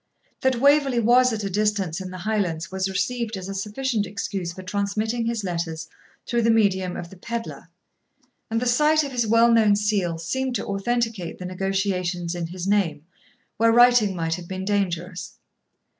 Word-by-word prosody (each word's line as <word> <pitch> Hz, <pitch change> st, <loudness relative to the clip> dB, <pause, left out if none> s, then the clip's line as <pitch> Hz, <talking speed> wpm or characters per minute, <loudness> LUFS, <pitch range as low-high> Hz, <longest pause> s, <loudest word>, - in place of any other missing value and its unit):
That 260 Hz, 0 st, +2 dB
Waverley 280 Hz, -2 st, +4 dB
was 245 Hz, +3 st, +5 dB
at 215 Hz, -2 st, -3 dB
a 200 Hz, -, -2 dB
distance 200 Hz, -4 st, 0 dB
in 185 Hz, -, -6 dB
the 185 Hz, -, -7 dB
Highlands 180 Hz, -5 st, -2 dB
was 190 Hz, 0 st, -1 dB
received 220 Hz, +3 st, -2 dB
as 185 Hz, -1 st, -7 dB
a 195 Hz, -, -4 dB
sufficient 210 Hz, +2 st, -2 dB
excuse 195 Hz, -3 st, -4 dB
for 185 Hz, +2 st, -10 dB
transmitting 210 Hz, +4 st, -1 dB
his 230 Hz, -2 st, -2 dB
letters 165 Hz, -3 st, -3 dB, 0.4 s
through 235 Hz, -1 st, 0 dB
the 230 Hz, -, +2 dB
medium 190 Hz, -5 st, +2 dB
of 170 Hz, -, -7 dB
the -, -, -11 dB
pedlar; 235 Hz, +4 st, -6 dB, 0.8 s
and 225 Hz, 0 st, 0 dB
the 250 Hz, -, -2 dB
sight 300 Hz, +5 st, +3 dB
of 280 Hz, -, -5 dB
his 240 Hz, -3 st, 0 dB
well 230 Hz, +2 st, +5 dB
known 220 Hz, -3 st, +5 dB
seal 200 Hz, -5 st, 0 dB
seemed 255 Hz, +10 st, -2 dB
to -, -, -2 dB
authenticate 215 Hz, -2 st, -2 dB
the 180 Hz, -, -7 dB
negotiations 185 Hz, -2 st, -1 dB
in 175 Hz, -1 st, -3 dB
his 180 Hz, +1 st, -6 dB
name, 195 Hz, -7 st, +1 dB, 0.5 s
where 230 Hz, +1 st, +4 dB
writing 240 Hz, -4 st, +5 dB
might 165 Hz, -1 st, -1 dB
have 170 Hz, 0 st, -6 dB
been 190 Hz, +1 st, -5 dB
dangerous. 185 Hz, -3 st, -2 dB
200 Hz, 175 wpm, -24 LUFS, 180-230 Hz, 0.8 s, was